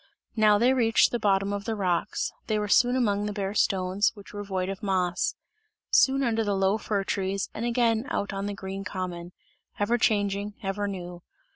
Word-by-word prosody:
Now 215 -2 +5
they 245 +4 +4
reached 230 -4 +3
the 240 - -1
bottom 195 -1 +1
of 200 0 -4
the 225 - -2
rocks, 185 -1 -1 0.2
they 215 - +1
were 210 0 -1
soon 245 +4 +4
among 210 -5 +1
the - - -2
bare 200 -1 -3
stones, 190 0 +2
which 205 -1 -13
were 205 0 -5
void 190 -2 -2
of 195 +2 -5
moss; 185 -3 0 0.6
soon 270 +1 +4
under 225 -3 +1
the 205 -2 0
low 195 +2 +2
fir 205 -2 -1
trees 195 0 -2
and 230 - -4
again 235 0 +1
out 200 - -2
on 195 +1 -3
the 205 - -4
green 195 0 -6
common 180 -3 -5 0.5
ever 230 +4 +1
changing, 205 -1 0
ever 200 +1 -2
new. 180 -3 -6
205 Hz, 190 wpm, -27 LUFS, 195-220 Hz, 0.6 s, Now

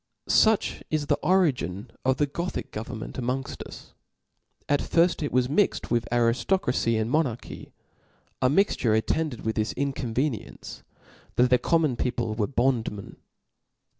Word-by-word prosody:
• - - +2
Such 220 -2 +3
is 155 -2 0
the 145 - +1
origin 130 - +1
of 130 0 +2
the 145 - +2
Gothic 170 +5 -4
government 110 +1 -6
araongft 130 +1 -3
us. - - -12 0.7
At 145 -1 +2
firft 170 0 +2
it 145 - -2
was 125 0 +2
mixt 175 +10 +1
with 120 -1 +1
ariftocracy 120 - +1
and 110 - 0
monarchy; 135 -7 -2 0.7
a 130 - +4
mixture 140 - +2
attended 125 +3 -1
with 110 - -1
this 110 -1 0
inconveniency, 135 -2 -3 0.5
that 125 0 +3
the 125 - +5
common 155 -7 +1
people 120 -3 -1
were 110 -1 -1
bond 125 -3 +1
men. 100 -2 -9
125 Hz, 140 wpm, -26 LUFS, 115-150 Hz, 0.7 s, the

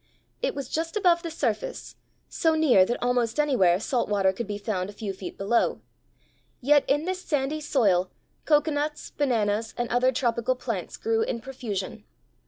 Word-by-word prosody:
It - - -1
was 280 -3 -4
just 330 +7 -2
above 350 -4 +3
the 335 - -5
surface, 240 -9 -3 0.3
so 325 -1 +1
near 270 -12 +5
that 240 - -1
almost 245 0 +1
anywhere 195 -12 +3
salt 240 +2 -1
water 195 -2 +2
could 205 +3 -5
be 205 -1 -3
found 200 -3 -3
a - - -9
few 205 -1 -5
feet 190 -1 -8
below; 210 +4 +1 0.8
yet 290 +2 +4
in 290 +3 +1
this 370 0 -2
sandy 295 -1 -1
soil 200 -11 +2 0.4
cocoanuts, 295 0 +1
bananas, 225 -5 0
and 240 - -1
other 250 +2 +3
tropical 240 0 0
plants 250 - -4
grew 450 0 0
in 255 - -1
profusion. 225 -7 -5
250 Hz, 165 wpm, -26 LUFS, 210-295 Hz, 0.8 s, near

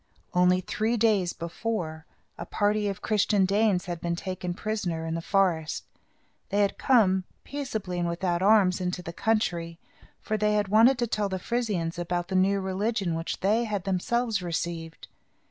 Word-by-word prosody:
Only 180 +1 +4
three 220 +5 -1
days 205 -5 +2
before, 165 -2 -4 0.3
a - - -6
party 205 +3 0
of 195 -2 -4
Christian 210 -2 +2
Danes 200 -1 +2
had 175 -3 -5
been 170 0 -1
taken 180 -1 -4
prisoners 180 -6 -3
in 160 - -2
the 165 - -2
forest. 170 -4 +1 0.7
They 205 +1 +2
had 200 - 0
come, 190 -8 +4 0.2
peaceably 220 -11 -4
and 170 0 0
without 175 0 -1
arms, 195 -2 +4
into 180 0 -2
the 170 - -6
country; 170 -6 -1 0.4
for 215 - -2
they 210 0 +2
wanted 225 +6 +5
to 240 - +1
tell 210 -3 -1
the 190 - -2
Frisians 185 -6 -2
about 175 0 -2
the 190 - -2
new 195 +2 +3
religion, 190 0 -1
which 165 +1 -4
they 215 +5 +2
had 205 -4 -2
themselves 210 +3 0
received. 165 -1 -4
190 Hz, 165 wpm, -27 LUFS, 175-215 Hz, 0.7 s, wanted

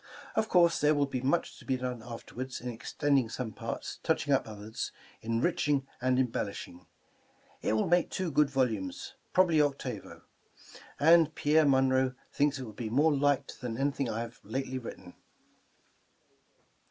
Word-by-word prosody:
Of 220 - 0
course, 170 -2 +4
there 150 +1 +4
will 145 -1 +3
be 130 -2 -3
much 140 +7 0
to - - -14
be 130 - 0
done 125 -2 -4
af 115 0 -8
terward, 130 +1 -6
in 125 - -5
extending 130 +2 0
some 115 -1 -4
parts, 115 +2 -5
touching 155 -3 +1
up 135 - +2
others, 110 +1 -5 0.3
enriching 135 +4 +1 0.2
and 130 0 +2
embellishing. 100 -8 -3 0.7
It - - 0
will 110 - +1
make 175 0 +3
two 185 -3 -2
good 150 0 +3
volumes 110 -9 -1
— - - -41
probably 170 -4 +5
octavo; 145 -2 -3 0.8
and 160 0 +5
Pierre 150 +1 +4
Munroe 130 -1 +3 0.2
thinks 145 0 +2
it 130 - -5
will 110 -3 -8
be 110 +1 -5
more 145 +7 +3
liked 145 0 0
than 120 -3 -4
anything 140 -1 0
I 115 +1 -2
have 115 0 -7
lately 130 +4 -3
writ 120 - -7
ten. 90 -1 -14
130 Hz, 165 wpm, -30 LUFS, 115-145 Hz, 0.8 s, probably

